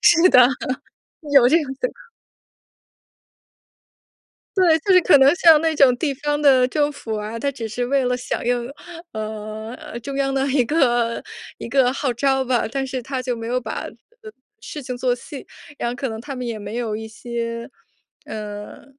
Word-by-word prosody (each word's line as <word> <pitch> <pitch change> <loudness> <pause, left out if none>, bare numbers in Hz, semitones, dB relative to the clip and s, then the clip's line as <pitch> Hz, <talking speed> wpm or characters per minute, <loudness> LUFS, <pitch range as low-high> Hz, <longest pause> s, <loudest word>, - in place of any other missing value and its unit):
是 345 +1 +6
的， 250 -1 +7 0.9
有 265 -4 +7
这 325 - +5
样 320 - -1 0.2
的。 - - -5 2.5
对， 340 -4 +5
就 390 - +2
是 365 - +7
可 345 -5 +6
能 275 +3 +6
像 325 -3 +6
那 320 0 +1
种 270 -4 +5
地 280 +1 -1
方 295 +2 -2
的 265 -4 +5
政 295 +1 +1
府 225 -6 -5
啊， 210 +2 -5
它 280 +5 -1
只 235 -5 -6
是 245 +3 -2
为 275 +1 +1
了 250 0 +1
响 250 - -4
应， 245 0 0 0.4
呃， 220 +6 -6
中 275 +3 -6
央 275 -1 0
的 270 0 0
一 265 -2 +2
个 240 -5 +1 0.4
一 - - -7
个 255 0 +3
号 270 -2 -1
召 265 +2 +1
吧， 250 -2 +1
但 270 +2 -2
是 260 -1 -4
它 265 +1 -4
就 255 -1 -2
没 230 -1 -6
有 250 +1 0
把 220 -2 -5 0.7
事 300 - -7
情 250 -1 -5
做 250 0 +1
细， 265 +3 -7 0.3
然 235 - -2
后 245 - -6
可 265 +1 -3
能 220 -1 -6
它 275 +2 -7
们 250 -1 -4
也 230 -2 -3
没 205 +2 -6
有 230 -3 -2
一 220 +1 -6
些， 230 +1 -5 0.6
呃， 210 -1 -7
250 Hz, 195 characters per minute, -21 LUFS, 230-280 Hz, 2.5 s, 的